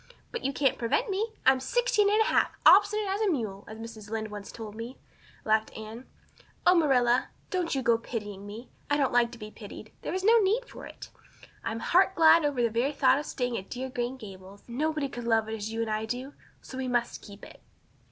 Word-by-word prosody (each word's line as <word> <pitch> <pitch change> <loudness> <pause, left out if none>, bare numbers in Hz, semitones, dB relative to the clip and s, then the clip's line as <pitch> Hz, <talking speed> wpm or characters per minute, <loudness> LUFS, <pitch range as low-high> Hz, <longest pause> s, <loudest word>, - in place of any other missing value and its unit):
"But 470 - -5
you 275 - 0
can't 275 -2 +1
prevent 395 - 0
me. 435 +4 -2
I'm 265 0 +5
sixteen 420 - +2
and 425 +2 +3
a - - +6
half, - - +2
'obstinate 415 +2 +6
as 390 +2 -1
a 425 - +2
mule,' 215 - -3
as 220 - -9
Mrs. 225 -2 -9
Lynde 220 -1 -3
once 205 -1 -7
told 220 -2 -8
me," 230 +4 -7 0.5
laughed 220 0 +2
Anne. 220 +3 -9 0.6
"Oh, 360 - +7
Marilla, 255 -7 +3 0.2
don't 360 -5 -1
you 265 - -1
go 230 -1 +3
pitying 205 -4 -6
me. 220 +5 -9 0.2
I 290 - +2
don't 275 -4 +1
like 240 -1 +3
to - - -9
be 215 -1 -9
pitied, 215 0 -10
and - - -32
there - - -4
is 375 - -2
no 455 +3 +6
need 435 +5 +1
for - - -10
it. - - -11 0.5
I'm 225 0 -3
heart 380 +2 +3
glad 330 0 +6
over 280 -4 +1
the 230 - +2
very 245 +6 0
thought 275 -1 +4
of 300 - -6
staying 245 -2 -2
at 190 - -12
dear 260 +1 -4
Green 245 +1 -3
Gables. 195 -3 -12
Nobody 300 +4 -1
could 240 -3 -7
love 225 -1 +2
it 220 - -4
as 220 0 -4
you 225 0 -2
and 225 -1 -2
I 215 +1 -1
do 255 +5 -5 0.3
so 260 - -8
we 260 - -2
must 240 -1 -1
keep 200 -1 -12
it." - - -15
245 Hz, 230 wpm, -28 LUFS, 220-315 Hz, 0.6 s, Oh